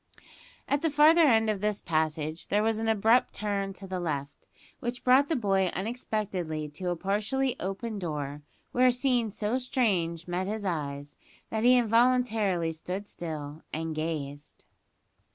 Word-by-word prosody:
At 285 0 +1
the 325 - +2
farther 305 +3 +6
end 225 -8 +5
of 210 -3 -1
this 210 -1 0
passage, 155 0 -1
there 210 +1 +2
was 220 0 +1
an 225 - -2
abrupt 225 +3 +3
turn 200 -2 -2
to 195 +1 -10
the 185 -1 -4
left, 145 -5 -4 0.3
which 245 -1 -4
brought 260 +3 +5
the 325 - +1
boy 195 -6 +2
unexpectedly 190 -7 -3
to 180 +5 -4
a 175 - 0
partially 215 +9 0
open 200 +3 -4
door, 150 -4 -4 0.3
where 255 +1 +4
a - - +6
scene 245 -3 +1
so 215 +4 -1
strange 185 - 0
met 180 +2 -2
his 210 0 -3
eyes 145 -5 -4 0.3
that 220 0 -1
he 250 +1 +6
involuntarily 225 -7 +2
stood 180 +5 -5
still 155 -4 -6
and 160 +1 -3
gazed. 150 -2 -5
200 Hz, 155 wpm, -28 LUFS, 165-235 Hz, 0.3 s, farther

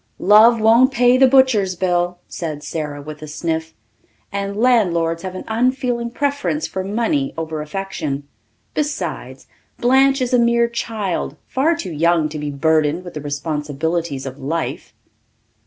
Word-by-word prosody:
"Love 220 +4 +6
won't 230 +5 +5
pay 245 -1 +4
the 265 +1 +6
butcher's 250 -8 +3
bill," 175 -1 0
said 155 -4 -5
Sara 150 -3 -5
with 155 0 -9
a 155 - -7
sniff, 160 +1 -3 0.6
"and 200 0 -3
landlords 175 -9 +2
have 185 0 -6
an - - -6
unfeeling 245 +1 0
preference 285 +4 -1
for 190 - -4
money 240 +8 -1
over 160 -1 -4
affection. 150 -4 -4 0.5
Besides, 170 - -4 0.3
Blanche 270 +2 +4
is 255 -1 -1
a 250 - +5
mere 235 0 +3
child, 220 -6 -3
far 305 +6 +1
too 195 - -5
young 165 0 +2
to 150 0 -6
be 150 0 -3
burdened 155 +3 +1
with 175 - -9
the 150 - -6
responsibilities 150 +1 -3
of 135 +1 -7
life." 160 +4 -3
185 Hz, 145 wpm, -19 LUFS, 155-240 Hz, 0.6 s, Love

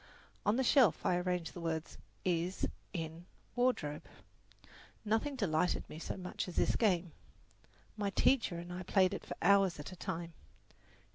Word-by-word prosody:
On 205 - +4
the 265 - +2
shelf 245 - +4
I 175 - +3
arranged 180 -2 -1
the 175 - -7
words, 160 -1 -3 0.3
is, 180 +1 0 0.2
in, 165 -1 -5 0.3
wardrobe. 245 -13 +1 1.0
Nothing 225 +7 +1
delighted 180 -7 +1
me 155 - -8
so - - -4
much 180 0 -4
as 180 - -7
this - - +2
game. 180 -6 +2 0.8
My 205 -2 -1
teacher 220 -4 +2
and 175 +1 -6
I 180 - -5
played 185 +1 +3
it 185 - -5
for - - -6
hours 195 -4 +4
at 145 - -7
a - - -8
time. 170 -2 -4
180 Hz, 155 wpm, -34 LUFS, 170-205 Hz, 1.0 s, On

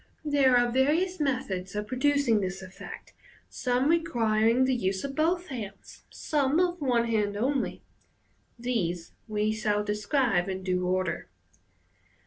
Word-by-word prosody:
There 275 -4 +4
are 245 0 +2
various 315 +9 +2
methods 205 -10 -2
of 210 0 -2
producing 255 -2 +2
this 190 0 -4
effect, 185 0 -10 0.4
some 250 +1 0
requiring 235 -7 +2
the 260 - +2
use 190 -5 -1
of 280 -1 -4
both 345 +4 0
hands, 210 -7 -8
some 290 +1 0
of 355 -1 +1
one 245 -4 +2
hand 210 -3 0
only. 265 +5 -1 0.7
These 185 -9 -2 0.2
we 215 0 0
shall 210 -1 0
describe 210 -2 +1
in 190 0 -4
due 180 -1 0
order. 185 - -1
235 Hz, 130 wpm, -28 LUFS, 205-275 Hz, 0.7 s, There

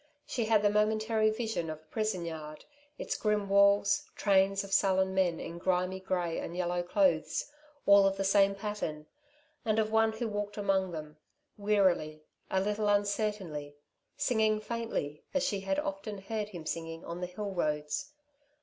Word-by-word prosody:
She 235 - -2
had 215 -1 +3
the 205 - +4
momentary 215 +1 +2
vision 220 -7 -2
of 155 - -4
a 155 - -24
prison 215 -5 -2
yard, 155 -2 -7 0.3
its - - -3
grim 210 -2 0
walls, 200 +1 +4
trains 195 -1 +3
of 195 0 -7
sullen 190 -1 +3
men 180 -3 +1
in 170 - -6
grimy 185 +1 0
grey 180 -3 -1
and 170 - -6
yellow 175 0 0
clothes, 175 - +1 0.3
all 200 -1 +7
of 195 0 -1
the 195 - 0
same 195 0 +4
pattern, 195 -7 -4 0.6
and 220 -3 +1
of 220 -1 +1
one 220 0 +3
who 225 +1 -3
walked 205 -1 -4
among 195 -2 +1
them, 155 -2 -7 0.4
wearily, 190 -7 +1 0.3
a 190 - +1
little 210 +2 0
uncertainly, 200 -8 -1 0.4
singing 220 -3 +2
faintly, 215 -10 -4
as 275 - +2
she 200 -6 0
had 195 +9 -1
often 295 -8 -3
heard 210 +2 -4
him 175 -6 -8
singing 165 +1 -5
on 170 +1 -6
the 180 - -2
hill 200 +3 -5
roads. 155 - -2
195 Hz, 165 wpm, -31 LUFS, 175-215 Hz, 0.6 s, all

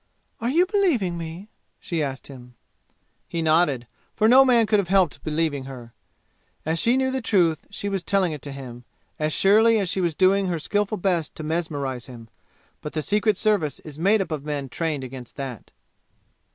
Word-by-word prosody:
"Are 230 - -1
you 335 +7 +4
believing 345 - +1
me?" 170 +5 -7 0.3
she 170 -2 -3
asked 135 -2 -4
him. 125 -3 -12 0.7
He 165 -1 -2
nodded, 155 -6 +2 0.3
for 215 - +3
no 260 +3 +8
man 240 -3 +4
could 210 -1 +3
have 195 - -1
helped 185 -3 +2
believing 150 -3 -1
her. 125 -3 -10 0.7
As 160 +1 0
she 240 +3 +3
knew 260 0 +1
the 260 0 -2
truth, 175 -8 +1
she 205 0 -5
was 195 -2 -1
telling 185 0 +1
it 150 -3 -6
to 145 - -7
him, 125 -3 -9 0.4
as 155 0 0
surely 220 +6 +5
as 195 -4 0
she 190 - 0
was 170 -3 0
doing 190 +2 +3
her 175 -2 -1
skillful 205 +6 -1
best 175 -5 -1
to 155 - -6
mesmerize 145 -6 -3
him. 115 -3 -11 0.5
But 150 - -7
the 155 - -2
Secret 210 +1 +1
Service 200 -9 +1
is 150 -1 -10
made 200 +5 +3
up 185 - -4
of 150 -3 -3
men 145 -2 -4
trained 155 -1 -2
against 125 -1 -9
that. 135 -6 -7
170 Hz, 190 wpm, -24 LUFS, 145-205 Hz, 0.7 s, no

